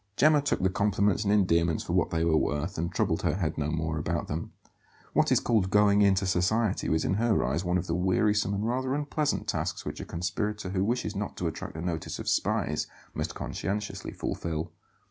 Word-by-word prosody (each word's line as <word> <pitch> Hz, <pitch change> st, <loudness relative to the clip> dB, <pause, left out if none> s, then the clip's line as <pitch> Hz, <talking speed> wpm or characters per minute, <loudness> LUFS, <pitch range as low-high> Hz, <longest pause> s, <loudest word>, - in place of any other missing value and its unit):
Gemma 150 Hz, +1 st, +5 dB
took 145 Hz, -, 0 dB
the 95 Hz, -, +4 dB
compliments 100 Hz, +1 st, +1 dB
and 100 Hz, -, +2 dB
endearments 85 Hz, -5 st, +2 dB
for -, -, -4 dB
what -, -, +2 dB
they 80 Hz, 0 st, 0 dB
were 80 Hz, -2 st, +3 dB
worth, 75 Hz, +3 st, 0 dB
and 85 Hz, +1 st, -1 dB
troubled -, -, 0 dB
her -, -, +1 dB
head 85 Hz, -5 st, -1 dB
no 75 Hz, -1 st, -1 dB
more 80 Hz, 0 st, -1 dB
about 85 Hz, +2 st, -2 dB
them. 80 Hz, +2 st, -4 dB, 0.6 s
What -, -, +3 dB
is -, -, +5 dB
called 110 Hz, -6 st, +1 dB
"going 105 Hz, 0 st, +4 dB
into 100 Hz, -1 st, +4 dB
society" 95 Hz, +4 st, +1 dB
was 80 Hz, 0 st, +1 dB
in -, -, +1 dB
her 110 Hz, +2 st, +2 dB
eyes 85 Hz, -, -1 dB
one 90 Hz, 0 st, +1 dB
of 85 Hz, -, -2 dB
the 85 Hz, -, -2 dB
wearisome 100 Hz, +3 st, +2 dB
and 100 Hz, +2 st, -2 dB
rather 130 Hz, +2 st, 0 dB
unpleasant 150 Hz, 0 st, -1 dB
tasks -, -, -2 dB
which -, -, -5 dB
a -, -, -6 dB
conspirator 95 Hz, +4 st, -3 dB
who 95 Hz, 0 st, 0 dB
wishes 110 Hz, -1 st, -1 dB
not 100 Hz, +1 st, -4 dB
to 90 Hz, -, -3 dB
attract 80 Hz, -1 st, -4 dB
the 80 Hz, -, -5 dB
notice 85 Hz, -2 st, -3 dB
of -, -, -7 dB
spies 95 Hz, -8 st, 0 dB, 0.3 s
must -, -, -3 dB
conscientiously 100 Hz, +1 st, -4 dB
fulfil. 80 Hz, 0 st, -3 dB
95 Hz, 205 wpm, -28 LUFS, 85-105 Hz, 0.6 s, Gemma